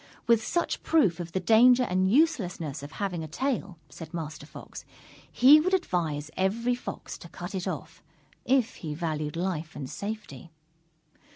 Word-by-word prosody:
With 230 -2 +4
such 345 +9 -1
proof 210 - +2
of 170 -1 -5
the 190 - -1
danger 240 +6 +6
and 185 -3 +1
uselessness 190 - +1
of 145 +1 -9
having 180 -5 -3
a - - -6
tail, 200 - -2
said 165 0 -10
Master 150 -3 -6
Fox, - - -10 0.5
he 280 +5 +7
would 370 +5 +2
advise 160 - -2
every 230 +6 +1
Fox 245 - -7
to 170 - -11
cut 175 +3 -8
it 185 -2 -3
off, - - -6 0.4
if 255 -3 +1
he 155 -3 -5
valued 155 -2 -3
life 170 -3 -3
and 140 -3 -5
safety. 200 - -7
185 Hz, 160 wpm, -28 LUFS, 160-235 Hz, 0.5 s, he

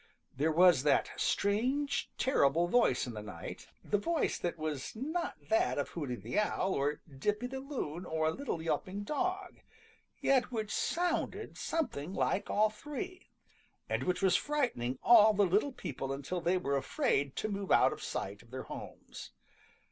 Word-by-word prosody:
There 155 +4 +1
was 175 -3 +6
that 145 0 +2
strange, 255 +8 0
terrible 170 - +3
voice 240 -2 +3
in 120 - -6
the 105 - -6
night, 105 -6 -8 0.2
the 205 - +1
voice 335 +7 0
that 175 -1 -2
was 155 -1 -4
not 315 +9 -2
that 220 - +2
of 145 - -1
Hooty 145 -7 -4
the 120 - -2
Owl 195 -2 0
or 145 +2 -1 0.2
Dippy 210 - 0
the 265 +2 -4
Loon 250 - -4
or 160 -3 -1
a 160 - +3
little 210 - -4
yelping 190 +4 -2
dog, 370 - -2 0.6
yet 260 -2 +2
which 220 -3 -3
sounded 350 0 -1
something 190 - -2
like 200 - 0
all 215 +1 +3
three, 360 - -7 0.6
and - - -1
which 180 +1 -1
was 185 -2 +5
frightening 235 - 0
all 220 -2 +7
the 200 0 +4
little 205 +10 +2
people 135 - -5
until 140 +6 -3
they 175 +2 +2
were 140 -6 0
afraid 140 - 0
to - - -2
move 200 -2 -4
out - - +5
of - - -10
sight 100 +2 -4
of 120 - -20
their 130 +1 -6
homes. - - -9
195 Hz, 165 wpm, -32 LUFS, -, 0.6 s, all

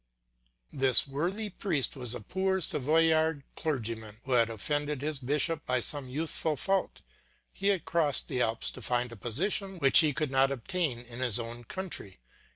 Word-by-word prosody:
This 135 -2 +8
worthy 180 +10 -3
priest 160 - -1
was 125 -3 -2
a 120 - -7
poor 190 - -1
Savoyard 160 0 +1
clergyman 115 -8 -4
who 135 - -7
had 115 -2 +3
offended 145 +5 -3
his 150 -2 -3
bishop 150 +4 -1
by 125 0 +1
some 135 +1 +1
youthful 155 +2 -2
fault; 195 +6 -2 0.5
he 195 - -3
had 195 -4 +1
crossed 155 -5 0
the 130 -3 -2
Alps 115 -1 -1
to - - -11
find 125 0 -1
a - - -9
position 185 - -1
which 135 -5 +7
he 155 -3 +4
could 150 -1 -3
not 135 0 +3
obtain 140 +1 -2
in 120 0 -11
his 125 -4 +2
own 120 +1 -7
country. 175 - -6
140 Hz, 165 wpm, -29 LUFS, 125-165 Hz, 0.5 s, This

